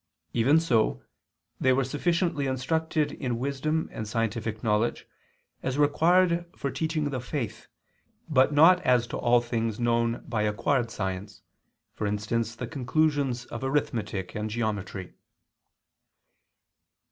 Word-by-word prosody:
Even 135 +7 +4
so 110 - +1 0.6
they 130 - +3
were 135 +1 +3
sufficiently 150 +2 0
instructed 150 +3 0
in 125 -5 -3
wisdom 140 +5 -1
and 110 - -5
scientific 115 0 -2
knowledge, 110 +1 0 0.5
as 130 +1 -2
required 170 +4 +3
for 140 - -2
teaching 155 -2 -1
the 130 - -2
faith, 125 -2 -5 0.6
but 135 -3 +4
not 165 +5 +6
as 125 -7 +3
to - - -6
all 120 0 +3
things 115 -2 -2
known 115 0 +1
by 115 -3 -1
acquired 115 +4 +1
science, 95 0 -5 0.5
for 105 - -2
instance 110 +2 -1
the - - -4
conclusions 140 -2 0
of 120 +1 -7
arithmetic 115 -9 -1
and 105 +1 -3
geometry. 105 -4 -3
125 Hz, 125 wpm, -27 LUFS, 110-145 Hz, 0.6 s, not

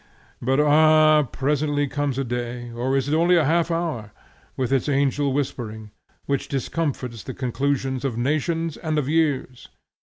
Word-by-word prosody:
But 130 +3 +1
ah! 155 +1 +5
presently 145 +1 0
comes 145 -1 -2
a 135 - 0
day, 120 0 -4
or 125 +3 -1
is 135 0 -1
it 145 - 0
only 170 +3 +4
a 165 -3 +3
half 165 +3 +2
hour, 160 -11 -2 0.5
with 130 0 0
its 135 +2 +1
angel 140 0 +1
whispering, 110 -6 -4 0.3
which 140 -1 -1
discomfits 135 -4 -3
the 130 - -7
conclusions 135 0 -1
of 130 -5 -2
nations 155 +5 -1
and 155 -2 -2
of 145 -3 0
years! 145 -5 -1
140 Hz, 155 wpm, -23 LUFS, 125-155 Hz, 0.5 s, ah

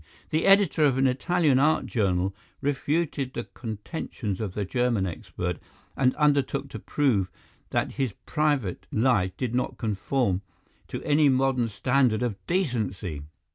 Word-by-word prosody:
The 155 +1 +1
editor 195 -6 +5
of 135 -3 +4
an 135 - +3
Italian 140 +2 +2
art 155 +3 +3
journal 95 -4 0 0.3
refuted 145 -1 -1
the 120 - -2
contentions 110 - -5
of 100 -4 -4
the 105 - -1
German 120 -2 +1
expert 90 0 -4 0.4
and 130 -1 +2
undertook 140 -2 +1
to - - -7
prove 115 -11 +1 0.4
that - - 0
his 130 -6 -2
private 145 - 0
life 110 -6 +2
did 125 -3 -2
not 125 - -1
conform 110 -2 0 0.5
to - - -6
any 150 0 +4
modern 130 -2 +2
standard 120 +3 +2
of 120 -4 -1
decency. 110 - -1
125 Hz, 135 wpm, -26 LUFS, 105-145 Hz, 0.5 s, editor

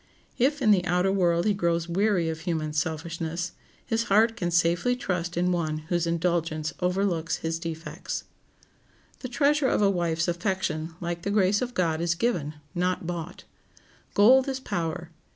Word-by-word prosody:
If 275 +3 +2
in 215 - +5
the 190 -3 +4
outer 180 +2 +2
world 175 -3 +2
he 210 - +3
grows 170 -3 0
weary 185 -1 +1
of 160 0 -3
human 155 -3 -2
selfishness, 165 +2 -2 0.3
his 225 -1 0
heart 220 +3 +4
can 175 -7 -2
safely 170 +7 +2
trust 175 -7 -3
in 180 +1 +2
one 160 -3 -1 0.2
whose 170 -1 +1
indulgence 165 -2 -1
overlooks 180 -2 0
his 165 0 -1
defects. 165 0 -5 1.0
The 255 - -6
treasure 285 +2 +2
of 210 - +2
a 200 - +4
wife's 170 -2 0
affection, 175 -3 -2
like 170 0 -3
the 200 - -3
grace 200 0 +3
of 250 -1 -3
God, 165 -3 +1
is 170 0 +1
given, 170 -8 -1 0.2
not 180 0 -1
bought. 170 -1 -5 0.7
Gold 255 +6 +6
is 265 -1 -2
power. 170 -6 -3
175 Hz, 160 wpm, -26 LUFS, 165-200 Hz, 1.0 s, Gold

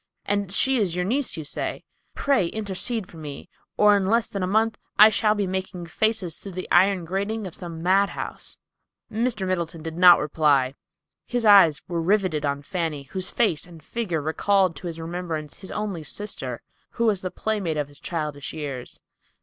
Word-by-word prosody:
And 200 -2 -1
she 265 +6 +3
is 190 -7 0
your 180 0 0
niece, 255 +1 -1
you 155 - -5
say. - - -3 0.3
Pray 270 -11 +2
intercede 210 +2 -3
for 165 - -14
me, 150 +1 -8 0.3
or 210 0 +6
in 195 -2 +1
less 230 +2 +2
than 200 - -4
a 185 - 0
month 220 +2 +1 0.2
I 215 +1 +9
shall 210 0 +2
be 205 -1 0
making 185 -1 -4
faces 200 -1 -1
through 195 - -8
the 185 +1 -5
iron 185 0 +4
grating 200 +5 -2
of 180 - -7
some 165 -2 -7
madhouse." 195 +3 0 0.5
Mr. 220 -3 0
Middleton 170 -3 -2
did 160 +1 -5
not 180 -1 +9
reply. 145 -4 +2 0.5
His 245 -2 -1
eyes 195 -8 +7
were 170 -1 -2
riveted 180 -5 +1
on 140 0 -2
Fanny, 160 -3 -3
whose 185 -1 -4
face 195 -10 +1
and 165 -3 -14
figure 180 -6 -2
recalled 185 +3 +2
to 180 - -6
his 165 -1 -5
remembrance 165 -3 -5
his 190 - -9
only 205 -6 -3
sister, 145 - -4 0.3
who 235 - 0
was 205 -4 +2
the 185 - -3
playmate 195 -7 -2
of 145 -2 -1
his 145 -1 -10
childish 150 -4 -4
years. 140 -5 -5
185 Hz, 180 wpm, -24 LUFS, 160-205 Hz, 0.5 s, I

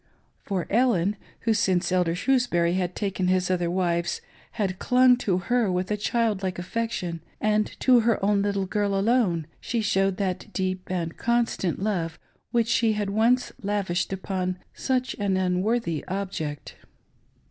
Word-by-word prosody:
For 190 -4 -2
Ellen, 210 -4 +3 0.3
who 225 - +2
since 190 -4 +1
Elder 180 -2 +2
Shrewsbury 180 -7 +2
had 180 -1 -1
taken 195 -3 -1
his 185 0 +2
other 175 -2 0
wives 170 -1 0 0.3
had 195 -4 -2
clung 250 0 +5
to 195 -7 0
her 220 +3 +1
with 180 +2 -1
a - - +2
child 215 -1 0
like 185 -2 -2
affection, 180 -3 -3 0.2
and 215 0 +2
to 255 -2 +6
her 225 -3 +1
own 205 0 +3
little 200 -1 0
girl 200 +1 0
alone, 195 -6 +2 0.2
shq 230 -1 -1
showed 195 -2 +1
that 190 +1 -3
deep 185 -1 -2
and 170 -3 -3
constant 235 -6 0
love 170 -7 -1 0.3
which 235 -1 +1
she 230 -1 +2
had 205 -1 -2
once 235 +4 +2
lavished 195 -4 -1
upon 185 -1 -2 0.2
such 255 -1 -1
an 195 -2 +1
unworthy 185 -1 0
object. 180 -6 -4
195 Hz, 150 wpm, -26 LUFS, 180-225 Hz, 0.3 s, to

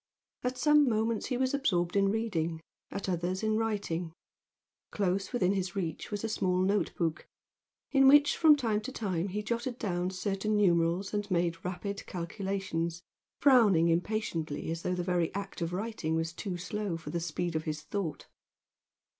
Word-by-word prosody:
At 250 +1 -1
some 300 -2 +5
moments 220 0 0
he 250 - -1
was 260 +1 +1
absorbed 180 -11 +1
in 195 0 +4
reading, 175 -7 -1 0.3
at 200 - -5
others 185 +2 -1
in 215 0 +2
writing. 200 -7 -2 0.8
Close 195 -1 -1
within 195 -6 +2
his 190 -1 -2
reach 170 -5 -3
was 205 0 -4
a - - 0
small 190 -4 0
note 200 +2 +1
book 165 -2 -2 0.6
in 270 -1 +6
which 290 +1 +7
from 315 -2 +7
time 225 -7 0
to 260 - -6
time 190 -7 -2
he 210 +2 -3
jotted 235 +2 -2
down 180 -5 -1
certain 195 +3 -1
numerals 175 0 +2
and 205 0 -2
made 170 -2 0
rapid 200 +3 -4
calculations, 175 -2 -3 0.4
frowning 210 - +6
impatiently 165 -4 -1
as 165 0 -3
though 180 - -1
the 180 - -2
very 175 -2 +1
act 200 -2 -5
of 170 0 -1
writing 185 -4 -2
was 165 0 -1
too 180 0 -4
slow 200 -1 -3
for 165 - -8
the 170 - -1
speed 170 +1 -3
of 160 - -1
his 155 -1 -3
thought. 165 -2 -4
190 Hz, 170 wpm, -30 LUFS, 170-215 Hz, 0.8 s, which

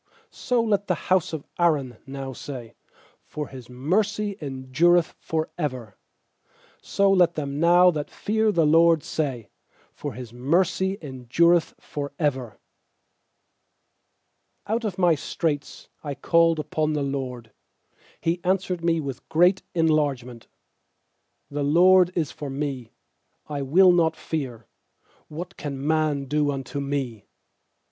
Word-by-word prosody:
8So 240 -2 0
let 205 -1 +1
the 180 - 0
bouse 185 -3 +3
of 160 -3 -5
Aaron 145 -8 +1
now 135 -1 -6
say, 125 -3 -8 0.5
For 150 -2 -5
His 130 -3 -11
mercy 200 +10 -1
endureth 145 +5 +1
for 160 -1 -3
ever. 125 -8 -4 0.9
4So 195 0 +2
let 175 -2 +4
them 140 -2 -3
now 175 +2 +6
that 150 -3 -4
fear 220 +1 0
the* 165 -5 +2
LORD 165 +1 +5
say, 130 -8 -3 0.4
For 145 -3 -6
His 120 0 -9
mercy 185 +9 +1
endureth 150 +6 +1
for 140 -1 -6
ever. 130 -8 -2 2.1
fiOut 225 +3 -1
of 195 -4 -3
my 175 -3 +4
straits 150 0 -3 0.2
I 145 -2 -4
called 165 +3 +3
upon 155 0 -1
the 150 -2 -1
LORD; 130 -5 -4 0.7
He 170 +2 -1
answered 185 -2 0
me 165 -1 +2
with 135 -4 -6
great 180 +4 +4
en 165 -1 +3
largement, 135 -6 -1
i - - -30
6The 145 0 0
LORD 180 +1 +6
is 160 -4 -1
forme; 135 -4 -5 0.6
I 145 -2 -4
will 180 +7 +5
not 170 -2 +2
fear; 130 -8 -5 0.6
What 175 +5 -8
can 140 -2 -5
man 155 -2 +1
do 150 +1 +1
unto 140 0 -4
me? 135 -6 -3
150 Hz, 130 wpm, -24 LUFS, 135-175 Hz, 2.1 s, now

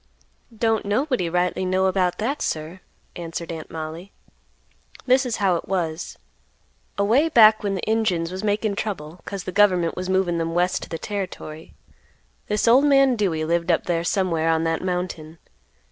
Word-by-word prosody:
"Don't 225 -1 +1
nobody 215 - 0
rightly 180 +2 0
know 185 +1 +1
about 185 -2 +1
that, 265 +7 -2
sir," 160 +4 -3 0.4
answered 170 0 -6
Aunt 160 -1 -7
Mollie. 160 +4 -7 0.9
"This 255 +1 +3
is 235 - -1
how 190 -4 +2
it - - -8
was: 170 -3 -3 0.8
away 235 +11 +3
back 220 -5 +6
when 200 -1 -1
the 190 - -5
Injuns 190 -7 0
was 190 +2 -5
makin' 210 0 0
trouble 180 -6 -5
'cause 200 -3 -5
the 185 - -5
government 185 -4 +3
was 185 0 -4
movin' 185 -3 +1
them 165 0 -2
west 180 +1 +1
to - - -8
the 165 - -4
territory, 175 -5 -6 0.7
this 210 +2 0
old 255 +5 +6
man 275 -3 +5
Dewey 175 -8 0
lived 170 +1 0
up 165 - +2
there 170 -1 -1
somewhere 170 -3 0
on 160 0 +2
that 165 0 -1
mountain. 180 -3 -4
185 Hz, 165 wpm, -23 LUFS, 165-210 Hz, 0.9 s, back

